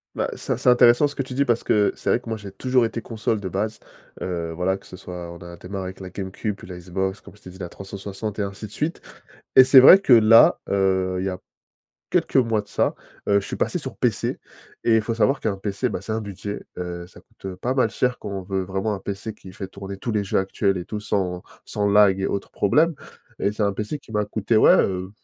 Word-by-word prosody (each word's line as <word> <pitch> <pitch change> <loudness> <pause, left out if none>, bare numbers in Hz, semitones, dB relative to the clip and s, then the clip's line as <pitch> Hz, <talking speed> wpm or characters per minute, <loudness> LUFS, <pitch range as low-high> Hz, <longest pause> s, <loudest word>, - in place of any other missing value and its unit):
Bah, - - -1
c'est - - -3
c'est - - +2
intéressant 125 +3 +6
ce 145 - -8
que - - -3
tu 130 -1 -6
dis 140 +1 +2
parce 120 -2 +1
que 105 -1 +3
c'est - - -4
vrai - - +3
que 125 - -17
moi, 110 - -2
j'ai 100 -2 -9
toujours 125 +5 +1
été 115 0 -2
console 110 -1 -2
de 100 - -5
base, 105 +4 -2 0.4
heu, 85 -2 -3
voilà, 90 +2 0
que - - -18
ce 90 - -10
soit 90 -2 -8
on 85 - -9
a 85 0 -10
démarré 95 +2 -6
avec 95 +1 -8
la 95 -1 -7
Game 95 0 -6
Cube 105 +2 -3
puis - - -13
la 90 -1 -8
Xbox 95 +2 -3
comme - - -15
je 105 - -22
t'ai 90 - -10
dit, 95 - -14
la 90 -2 -5
360, 100 +2 -7
et - - +1
ainsi 100 +1 -5
de 105 - -11
suite. 155 +9 -3 0.6
Et 130 - +10
c'est 130 0 +8
vrai 160 +9 +10
que, 165 -9 +2
là, 115 -1 +7
heu, 95 -1 +1
il 95 - -2
y - - +1
a 90 -1 -4 0.7
quelques - - 0
mois 115 -4 +3
de 105 - -21
ça, - - 0 0.3
heu, 100 0 +4
je - - -9
suis - - -4
passé - - -1
sur - - -7
PC - - 0 0.5
et 115 - +4
il - - +2
faut 115 +2 -3
savoir 135 +4 +2
qu'un 105 -3 -2
PC, 100 +5 -2
bah, 90 - -4
c'est 105 - -6
un 110 +1 -1
budget, 100 0 -6 0.2
heu, 90 -1 -5
ça 90 - -16
coûte 95 -1 -9
pas 120 +8 -2
mal 130 -4 +2
cher 125 +3 -1
quand - - -6
on 95 -1 -4
veut 95 +1 -2
vraiment 95 +3 -2
un 100 - -4
PC 100 +3 -5
qui 95 -3 -13
fait 95 - -6
tourner 100 +1 -8
tous 115 - -4
les 105 -2 0
jeux 95 - -1
actuels 95 0 0
et 90 - -5
tout, 105 - -5
sans 90 -4 -2 0.2
sans 105 -1 -1
lag 100 -2 +5
et 95 - 0
autres 100 - -4
problèmes. 155 +12 +3 0.5
Et 100 - +1
c'est 105 +1 -2
un 100 -1 +1
PC 105 +9 -4
qui 130 - -17
m'a 105 -1 0
coûté, 105 +2 -1
ouais, - - +7
heu, 95 -1 -3
100 Hz, 260 wpm, -23 LUFS, 95-110 Hz, 0.7 s, Et